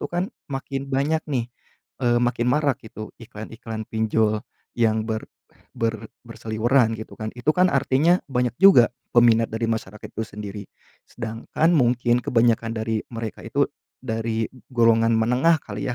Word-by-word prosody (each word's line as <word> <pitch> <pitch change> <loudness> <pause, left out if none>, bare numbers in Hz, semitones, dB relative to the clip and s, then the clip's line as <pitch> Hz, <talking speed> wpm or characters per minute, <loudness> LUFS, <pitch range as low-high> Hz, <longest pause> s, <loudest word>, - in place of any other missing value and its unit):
tuh - - -4
kan 175 +3 -1 0.2
makin 135 0 -4
banyak 145 +4 +1
nih, 125 -5 -1 0.6
eee, 120 -1 +3
makin 120 -1 0
marak 140 -2 +1
gitu 110 -1 -8
iklan-iklan 110 -1 -8
pinjol 110 -1 +1 0.3
yang 110 -2 +2
ber 110 -1 -3 0.5
ber 115 -1 -2 0.2
berseliweran 115 +1 +1
gitu 110 - -9
kan. 110 0 -4
Itu 125 +5 0
kan 180 +1 +4
artinya 140 +6 +3
banyak 125 -2 0
juga 185 -12 +7 0.2
peminat 115 -1 +5
dari 115 +1 -1
masyarakat 105 -2 -5
itu 110 - -2
sendiri. 105 0 -7 0.4
Sedangkan 115 +8 -1
mungkin 120 -3 +3
kebanyakan 115 -1 +2
dari 110 0 -1
mereka 115 -1 -6
itu - - +1 0.4
dari 115 -2 -2 0.3
golongan 115 -1 +4
menengah 125 +9 +3
kali 105 -1 -5
ya, - - -2
115 Hz, 145 wpm, -23 LUFS, 110-130 Hz, 0.6 s, juga